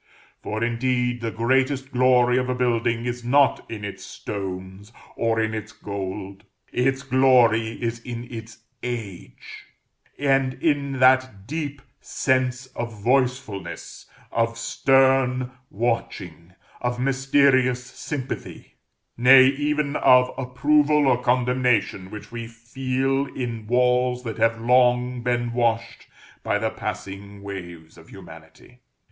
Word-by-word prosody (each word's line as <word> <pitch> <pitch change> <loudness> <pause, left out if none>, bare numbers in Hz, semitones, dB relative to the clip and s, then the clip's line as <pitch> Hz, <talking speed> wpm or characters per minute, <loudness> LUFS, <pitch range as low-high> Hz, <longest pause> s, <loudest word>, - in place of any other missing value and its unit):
For, 110 +2 -3
indeed, 125 +1 0
the 115 - -2
greatest 130 +4 0
glory 125 -1 +4
of 125 0 -2
a 125 - 0
building 120 -1 0
is 120 0 -4
not 140 +3 +3
in 105 -2 -6
its 100 - -7
stones, 95 +1 -7 0.2
or 115 -1 0
in 110 0 0
its 110 0 -5
gold. 100 0 -6 0.3
Its 135 +2 0
glory 125 -4 +3
is 115 -1 -3
in 120 0 -7
its 115 0 -9 0.2
Age, 110 - -7 0.5
and 135 -2 +1
in 145 -3 0
that 130 -6 +3
deep 145 0 -5 0.2
sense 130 0 -1
of 120 0 -4
voicefulness, 120 -7 -2 0.2
of 115 0 0
stern 130 0 +2 0.2
watching, 95 -6 -3 0.3
of 125 0 -2
mysterious 135 -1 +2
sympathy, 135 +2 -7 0.4
nay, 130 +2 +8
even 145 +2 0
of 125 0 +5
approval 145 +3 +2
or 125 -2 +2
condemnation, 125 -6 +1
which 105 +2 -10
we 115 -1 -6
feel 130 +4 -2
in 115 -4 -5
walls 125 +1 +2
that 115 -2 -6
have 115 0 +2
long 125 +1 +2
been 120 -1 -1
washed 115 -1 -1 0.3
by - - 0
the - - -1
passing 100 +1 -7
waves 85 -5 -9
of 80 - -17
humanity. 85 +6 -14
125 Hz, 120 wpm, -23 LUFS, 110-130 Hz, 0.5 s, nay